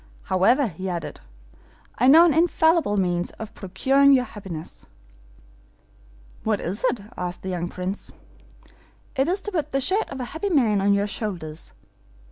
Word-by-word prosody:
'However,' 230 Hz, +10 st, +3 dB
he 185 Hz, +2 st, -6 dB
added, 175 Hz, -2 st, -5 dB, 0.8 s
'I 250 Hz, -, +4 dB
know 320 Hz, +5 st, +8 dB
an 335 Hz, -, +3 dB
infallible 320 Hz, -7 st, +3 dB
means 175 Hz, -2 st, 0 dB
of 220 Hz, -1 st, -9 dB
procuring 275 Hz, +8 st, +3 dB
your 255 Hz, -2 st, +4 dB
happiness.' 190 Hz, -9 st, -9 dB, 1.6 s
'What 215 Hz, -2 st, 0 dB
is 190 Hz, +5 st, -4 dB
it?' 250 Hz, -4 st, 0 dB
asked 180 Hz, 0 st, -5 dB
the 190 Hz, -, -4 dB
young 175 Hz, -1 st, -2 dB
Prince. 185 Hz, +3 st, -5 dB, 1.0 s
'It 270 Hz, +1 st, +1 dB
is 380 Hz, +3 st, -1 dB
to 415 Hz, -, -4 dB
put 310 Hz, -6 st, -2 dB
the 275 Hz, -, 0 dB
shirt 385 Hz, +11 st, 0 dB
of 270 Hz, -, -7 dB
a 250 Hz, -, -3 dB
happy 360 Hz, +6 st, -2 dB
man 230 Hz, -, +2 dB
on 200 Hz, +1 st, +3 dB
your 200 Hz, 0 st, +1 dB
shoulders. 175 Hz, -7 st, -6 dB
215 Hz, 155 wpm, -24 LUFS, 185-280 Hz, 1.6 s, know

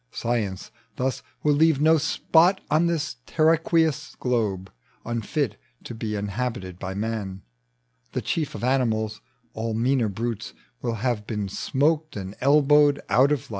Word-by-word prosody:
Science 110 Hz, -6 st, -2 dB, 0.3 s
thna 130 Hz, +1 st, -1 dB, 0.2 s
Will 150 Hz, -, +4 dB
leave 155 Hz, -1 st, +4 dB
no 160 Hz, +1 st, +5 dB
spot 175 Hz, +6 st, +3 dB
on 160 Hz, +3 st, +4 dB
this 155 Hz, -5 st, -2 dB
terraqueous 160 Hz, -1 st, +2 dB
globe 105 Hz, -7 st, -1 dB, 0.3 s
Unfit 120 Hz, +1 st, -2 dB, 0.3 s
to -, -, -7 dB
be 110 Hz, -1 st, -4 dB
inhabited 100 Hz, -3 st, -3 dB
by 95 Hz, 0 st, -5 dB
man, 100 Hz, -3 st, -3 dB, 0.7 s
The -, -, -1 dB
chief 155 Hz, -4 st, -2 dB
of -, -, -6 dB
animals: 110 Hz, -4 st, 0 dB, 0.3 s
all 110 Hz, 0 st, -3 dB
meaner 120 Hz, 0 st, +2 dB
brutes 115 Hz, +2 st, -4 dB, 0.3 s
Will 115 Hz, -, -1 dB
have 115 Hz, -4 st, -1 dB
been 105 Hz, -3 st, -2 dB
smoked 155 Hz, +9 st, 0 dB
and 95 Hz, 0 st, -6 dB
elbowed 145 Hz, +1 st, +5 dB
out 130 Hz, +6 st, +4 dB
of 145 Hz, -4 st, +1 dB
life. -, -, -17 dB
125 Hz, 140 wpm, -25 LUFS, 105-150 Hz, 0.7 s, no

